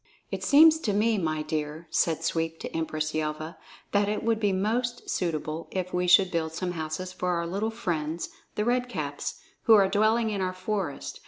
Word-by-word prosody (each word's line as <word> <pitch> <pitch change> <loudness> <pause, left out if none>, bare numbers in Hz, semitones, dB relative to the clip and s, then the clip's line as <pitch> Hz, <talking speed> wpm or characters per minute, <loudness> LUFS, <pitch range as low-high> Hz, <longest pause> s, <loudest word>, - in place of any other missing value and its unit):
"It - - -4
seems 315 +2 +7
to 215 -10 -1
me, 215 +1 +2
my 155 -3 -1
dear," 155 +1 -3
said 165 -1 +1
Sweep 165 0 -1
to - - -6
Empress 155 -1 -2
Yelva, 155 +1 -3 0.3
"that 205 0 +2
it 210 - -2
would 225 -1 +1
be 205 -2 +2
most 235 +6 -1
suitable 160 -2 -2
if 185 -1 -3
we 180 0 0
should 185 +1 +6
build 160 -2 -1
some 180 +2 -2
houses 165 +2 -4
for 180 - -2
our 170 0 -1
little 200 +6 -1
friends, 170 -8 -3 0.3
the 210 - 0
Red 245 +1 +1
Caps, 145 -9 -4 0.2
who 225 - +8
are 200 -2 +6
dwelling 215 +3 +2
in 200 -2 -2
our 185 0 -1
forest. 185 -5 -4
185 Hz, 190 wpm, -27 LUFS, 160-215 Hz, 0.3 s, who